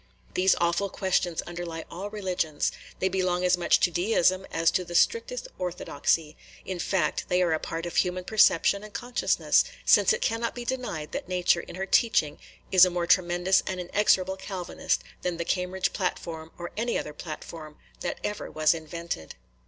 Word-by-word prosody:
These 185 +1 +4
awful 170 +3 +1
questions 180 -3 0
underlie 170 -2 -6
all 190 +4 -5
religions, 185 -7 -1
– - - -19
they 190 - +2
belong 185 -1 0
as 180 0 +4
much 175 -1 +3
to 175 - +3
Deism 185 +1 +2
as 165 0 +2
to 185 - 0
the 175 0 -8
strictest - - +1
orthodoxy, 165 -3 -1 0.2
– - - -21
in 185 -2 -4
fact, 170 -3 0
they 180 - +2
are 170 -2 +2
a 160 - 0
part 165 +1 -4
of 175 - -5
human 180 0 +1
perception 200 -1 +3
and 215 -1 -11
consciousness, 245 0 +2 0.2
since - - +6
it 470 - +1
cannot 230 +1 -1
be 245 -1 -6
denied 235 -12 -4
that - - -5
Nature 180 -1 +2
in - - -10
her 190 +1 -3
teaching 195 -8 +2 0.3
is 185 -1 +8
a 185 - +7
more 175 -1 -1
tremendous 175 +1 +3
and 185 -1 -3
inexorable 190 0 +2
Calvinist 190 -2 -2 0.2
than 175 -2 -2
the 170 - -3
Cambridge 180 +1 -1
Platform 165 -4 -3
or 175 0 -6
any 235 +2 0
other 150 - -5
platform 155 0 -8 0.2
that - - -3
ever 210 0 -3
was 155 +1 +3
invented. 165 - -6
180 Hz, 180 wpm, -27 LUFS, 170-190 Hz, 0.3 s, is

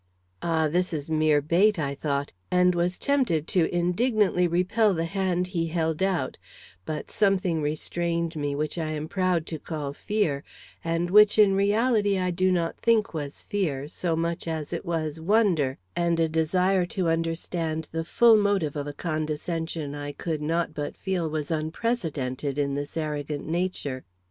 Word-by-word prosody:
"Ah, 160 -2 +1
this 180 +3 0
is 150 0 -4
mere 155 -2 +3
bait!" 185 +7 +3
I 140 -3 -1
thought, 140 0 -2 0.2
and 180 0 +4
was 175 +1 0
tempted 245 - +1
to 170 -4 +2
indignantly 180 +1 +2
repel 185 +4 +2
the 165 0 -1
hand 180 0 0
he 165 -2 0
held 160 0 -1
out; 190 -2 0 0.5
but 155 -1 -5
something 185 -5 +2
restrained 170 +2 -2
me 145 -2 -2
which 150 +3 -2
I 160 -1 -2
am 150 -1 -3
to 155 - -9
proud 185 -4 +1
to 160 -2 -5
call 145 -2 -5
fear, 160 -6 -1 0.4
and 165 +1 -1
which 210 +1 +7
in 205 -2 +6
reality 205 0 +2
I 180 -1 0
do 185 +2 +2
not 170 -2 0
think 225 -3 +2
was 145 -3 -5
fear, 150 -9 -2
so 165 +2 -2
much 170 +1 -2
as 160 -1 -3
it 170 - -4
was 160 -2 -2
wonder 175 -8 +2 0.2
and 170 -1 +1
a 165 - +3
desire 180 +4 +2
to 185 -3 +1
understand 165 -1 -1
the 165 0 -2
full 225 +6 +5
motive 200 -8 +1
of 145 -1 -3
a 145 - -5
condescension 155 0 -3
I 145 0 -5
could 160 -1 -3
not 165 +1 0
but 145 -1 -4
feel 180 -4 -1
was 155 0 -3
unprecedented 155 - -2
in 140 -1 0
this 145 +3 -4
arrogant 150 -2 -3
nature. 160 -6 -2
165 Hz, 170 wpm, -26 LUFS, 155-185 Hz, 0.5 s, which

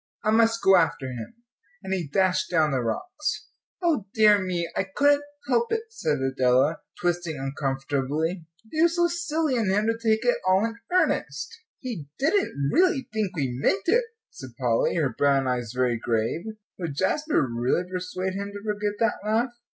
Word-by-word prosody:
"I 215 - +2
must 230 +1 +3
go 195 -1 +7
after 165 -5 +1
him," 125 - -7 0.5
and 190 0 -3
he 180 -5 -2
dashed 185 +5 +1
down 160 -3 +2
the 130 -2 0
rocks. 300 - -3 0.3
"O 300 - +1
dear 210 -2 +6
me, 180 -2 -2
I - - +1
couldn't 285 0 +4 0.3
help 235 -2 +1
it," 450 0 0
said 150 - 0
Adela, 135 +3 +2 0.2
twisting 175 -3 -1
uncomfortably, 140 +4 -2 0.2
"it 315 - 0
was - - -4
so 345 -1 +3
silly 325 -5 -1
in 220 -4 +1
him 205 +3 +2
to 225 - +2
take 225 0 0
it 245 - +3
all 190 +3 +4
in 230 0 -4
earnest." 145 - +1 0.3
"He 220 - -5
didn't 280 - +1
really 335 -3 +2
think 210 -4 -1
we 135 -6 -1
meant 195 +6 +2
it," 475 +4 +3 0.3
said 130 -3 -11
Polly, 120 -3 +1
her 145 -7 0
brown 140 -2 +2
eyes 120 -3 -2
very 125 -2 0
grave. 115 - -1 0.3
Would 165 -6 -4
Jasper 295 - +1
really 120 +8 0
persuade 185 +1 -3
him 200 +1 -4
to 205 0 -8
forget 210 -1 -2
that 225 -1 +1
laugh? 225 +4 +1
185 Hz, 175 wpm, -25 LUFS, 140-230 Hz, 0.5 s, go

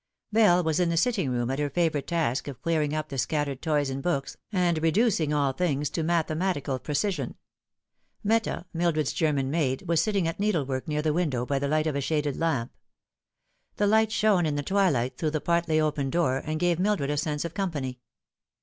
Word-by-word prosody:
Bell 205 -5 +5
was 160 +1 0
in 175 -1 +2
the 165 - 0
sitting 190 - +1
room 120 0 -1
at 135 - -2
her 145 -1 0
favourite 155 -2 0
task 150 -7 0
of 135 -4 -7
clearing 155 -3 0
op 155 0 -3
the 135 - -4
scattered 140 0 -1
toys 150 -4 0
and 135 +1 -4
books, 140 -4 -1 0.2
and 175 -5 +1
reducing 165 -2 +2
all 140 -2 +1
things 150 -3 -1
to 165 - -2
mathematical 160 -3 0
precision. 150 - -2 0.9
Meta, 220 -4 0
Mildred's 160 -7 0
German 140 -4 0
maid, 140 -3 0
was 165 -1 +3
sitting 200 -6 0
at 165 - -4
needlework 145 -11 -1
near 150 -1 -1
the 155 -1 +1
window 145 -8 0
by 140 +1 0
the 140 - -1
light 155 +2 +1
of 155 -3 -1
a 140 - 0
shaded 150 -1 -1
lamp. 140 -8 -1 1.0
The 205 - +1
light 220 +1 +3
shone 205 -6 +3
in 150 - -1
the 145 - -2
twilight 170 -10 +1
through 155 - +1
the 155 0 -1
partly 170 -1 +1
open 150 -3 0
door, 155 -5 +1
and 155 0 -3
gave 175 -1 +1
Mildred 185 -8 +1
a - - 0
sense 150 +1 -1
of 170 - -5
company. 145 -11 -3
155 Hz, 195 wpm, -27 LUFS, 140-175 Hz, 1.0 s, Bell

